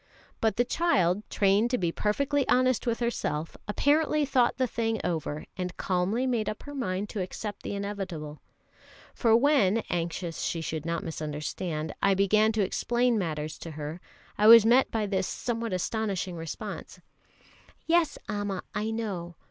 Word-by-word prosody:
But 220 -1 +1
the 245 - +2
child, 205 - +2
trained 200 +3 +3
to 250 - +1
be 175 -3 0
perfectly 280 +9 0
honest 255 -1 +2
with 235 +1 0
herself, 165 -9 -2
apparently 295 +6 +2
thought 255 -3 +2
the 260 - +2
thing 225 -2 -1
over, 155 -3 -2
and 180 -1 -3
calmly 190 +7 0
made 240 -4 0
up 215 - -6
her 290 - -8
mind 200 -7 -2
to 205 - -3
accept 205 +3 -5
the - - -4
inevitable; 190 -7 -5 0.7
for 225 -2 +4
when, 230 -6 +3
anxious 170 0 -3
she 170 - -1
should 160 0 -4
not 170 +3 -1
misunderstand, 155 0 -4
I 195 -1 +4
began 215 +3 +4
to 215 -2 +2
explain 240 +4 +1
matters 155 -4 -3
to 165 - -7
her, 155 +3 -5 0.4
I 210 - +5
was 230 -1 +10
met 245 +4 +5
by 220 -2 -1
this 190 -2 -1
somewhat 230 -1 -3
astonishing 190 -1 -2
response: 165 -2 -7 0.9
"Yes, 335 -2 +2
Amma, 205 -3 -3
I 210 +2 -1
know. 195 -7 -4
205 Hz, 155 wpm, -28 LUFS, 175-235 Hz, 0.9 s, was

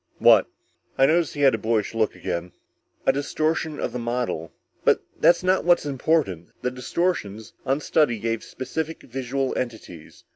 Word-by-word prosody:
"What?" - - +6 0.5
I 135 - +6
noticed 165 +2 +2
he 145 - -3
had 135 -2 +6
the 110 - -1
boyish 110 -1 0
look 110 -2 0
again. 90 -1 -4 0.5
"A 135 - +4
distortion 155 +2 -1
of - - -2
the 125 - -3
model. 120 -9 -2 0.3
But - - +3 0.2
that's 175 +1 +5
not 185 +1 +2
what's 175 -3 +4
important. 135 - 0
The 125 - 0
distortions, 125 - -2
on 135 +3 +1
study, 145 -8 +2
gave 115 +1 -2
specific 160 +4 -5
visual 135 +1 -2
entities. 110 -10 -6
130 Hz, 155 wpm, -24 LUFS, 110-155 Hz, 0.5 s, What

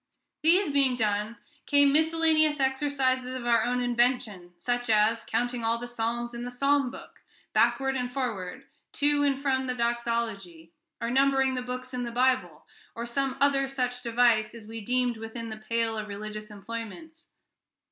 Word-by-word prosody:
These 335 +1 +4
being 270 -3 +3
done, 215 0 -1 0.3
came 285 -1 +5
miscellaneous 315 -1 +3
exercises 265 -1 0
of 250 -2 -5
our 235 -2 +3
own 250 0 0
invention, 240 -7 0
such 245 +5 -2
as 220 +1 +3
counting 240 +1 -2
all 225 +1 +1
the 240 +1 -6
psalms 240 0 -3
in 235 0 -6
the 245 - -4
psalm 275 +1 +1
book, 255 - -12 0.3
backward 270 0 +2
and 250 -1 -2
forward, 230 -9 -4 0.3
to 290 0 +2
and 280 -2 +1
from 265 -2 0
the 250 - -2
Doxology, 230 -8 -2 0.3
or 235 - -2
numbering 270 0 +3
the 255 - -2
books 250 +1 -6
in 250 - -2
the 240 -1 -4
Bible, 255 +2 +1 0.3
or 235 - -4
some 270 +2 -1
other 275 -1 +3
such 250 -2 -2
device 235 -2 +2
as 225 -2 -10
we 225 +1 -7
deemed 245 +1 0
within 225 +1 -7
the 220 - -6
pale 225 +1 -1
of 215 -1 -4
religious 215 +1 -7
employments. 230 - -8
245 Hz, 165 wpm, -27 LUFS, 230-270 Hz, 0.3 s, came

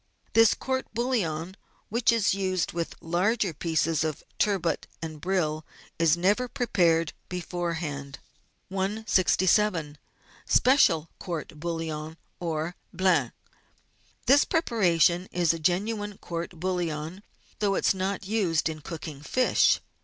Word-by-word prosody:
This 225 -1 +6
court 260 0 -2
bouillon, 190 -8 -1 0.3
which 235 +2 +3
is 225 -5 +2
used 185 -3 -1
with 170 -1 -3
large 195 +7 +1
pieces 160 -1 +1
of 155 -2 -3 0.2
turbot 195 -5 +1
and 155 -2 -7
brill, 160 -4 0 0.4
is 165 -1 +4
never 205 +8 +2
prepared 175 - +1 0.2
beforehand. 170 -6 -4 0.5
167— 190 -4 +1 0.5
SPECIAL 210 - +4
COURT 165 -4 -5
BOUILLON, 160 -1 -4 0.2
OR 165 0 -2 0.2
BLANC 185 0 +2 0.9
This 280 +2 +6
preparation 185 - +2
is 170 -2 +2
a 165 - -5
genuine 205 +5 -1
court 170 0 -6
bouillon, 175 -1 -2 0.4
though 200 -2 +1
it - - -1
is - - +5
not 190 +1 -2
used 185 -7 +1
in 155 -1 -6
cooking 155 -2 -7
fish. 255 +12 +3
175 Hz, 115 wpm, -27 LUFS, 160-205 Hz, 0.9 s, This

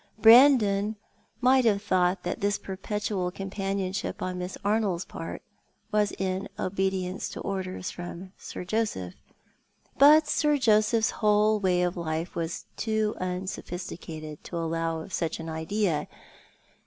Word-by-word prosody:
Brandon 220 -4 +6 0.5
might 260 +1 +5
have 205 -3 +2
thought 180 -1 +1
that - - -3
this 205 +1 +1
perpetual 195 -1 -3
companionship 195 0 -3
on 185 0 -3
Miss 180 +1 -5
Arnold's 205 -4 +1
part - - -7 0.5
was 210 -1 +2
in 190 0 -2
obedience 190 0 -2
to - - -7
orders 185 -2 -4
from 175 +1 -8
Sir - - -7
Joseph; 180 - -2 0.9
but 300 +2 +7
Sir 295 -1 +2
Joseph's 220 -2 +3
whole 210 0 +3
way 180 -2 +2
of 175 0 0
life 165 0 -3
was 165 0 -3
too 220 -1 0
unsoiDhisticated 175 -4 -5
to 170 - -6
allow 165 0 -1
of 185 - -10
such 165 -2 -1
an 165 0 -6
idea. 160 +1 -1
190 Hz, 130 wpm, -27 LUFS, 180-210 Hz, 0.9 s, but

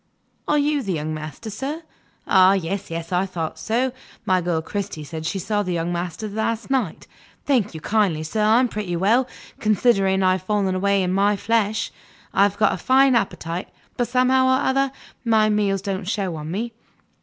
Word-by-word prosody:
"Are 295 - +3
you 290 0 +1
the 195 -6 -2
young 155 -1 -3
master, 155 - -7
sir? 280 +10 -4 0.4
Ah, 190 0 +6
yes, 195 +1 -2
yes; 165 +1 -5
I 180 +2 +1
thought 165 -4 -4
so. 245 +4 0 0.3
My 185 -1 +2
girl 170 -2 0
Cristy 190 -1 -5
said 160 +1 -5
she 180 - -2
saw 205 +3 -1
the 180 -3 -2
young 170 +1 -1
master 175 +4 -4
last 220 +4 -2
night. 250 -11 -1 0.4
Thank 230 - +1
you 160 - -7
kindly, 195 -7 +1
sir; 215 +8 -2
I'm 225 +4 +4
pretty 205 -6 -4
well, 225 +9 +3 0.3
considering 195 -3 +2
how 185 - +4
I've 185 0 +1
fallen 195 -1 0
away 200 +1 +2
in 180 0 0
my 200 +2 +3
flesh. 220 +1 0 0.4
I - - +3
have 200 0 +3
got 210 -1 +3
a - - -3
fine 265 +5 +4
appetite, 185 -5 -2 0.3
but 245 - 0
somehow 255 +1 +3
or 260 +1 +2
other, 270 0 +2 0.3
my 220 -2 +3
meals 200 -2 +1
don't 195 -2 -3
show 195 -5 -1
on 155 0 -6
me. 225 +7 -3
200 Hz, 190 wpm, -22 LUFS, 180-230 Hz, 0.4 s, Ah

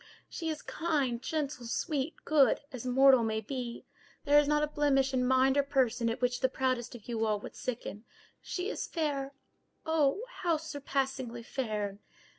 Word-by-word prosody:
She 325 - -4
is 310 -1 -4
kind, 285 -8 -1
gentle, 285 -6 -3
sweet, 295 +4 -1
good, 295 -3 +4
as 255 -1 -6
mortal 265 0 +6
may 220 -1 0
be. 240 +1 -5 0.4
There 290 +1 +7
is 295 - +2
not 300 0 +3
a - - +2
blemish 275 -3 +2
in 255 -1 +2
mind 260 +1 +4
or - - +6
person 255 -4 +1
at 235 +2 -3
which 245 0 +1
the 260 - +2
proudest 255 -2 -1
of 220 - -12
you 230 -2 -1
all 215 -2 +1
would - - -9
sicken. 230 -4 -5 0.4
She 360 +1 -3
is - - -4
fair—oh! 290 +2 -2
how 335 -3 +1
surpassingly 270 -5 -3
fair!" 210 -6 -3
265 Hz, 165 wpm, -31 LUFS, 240-295 Hz, 0.4 s, There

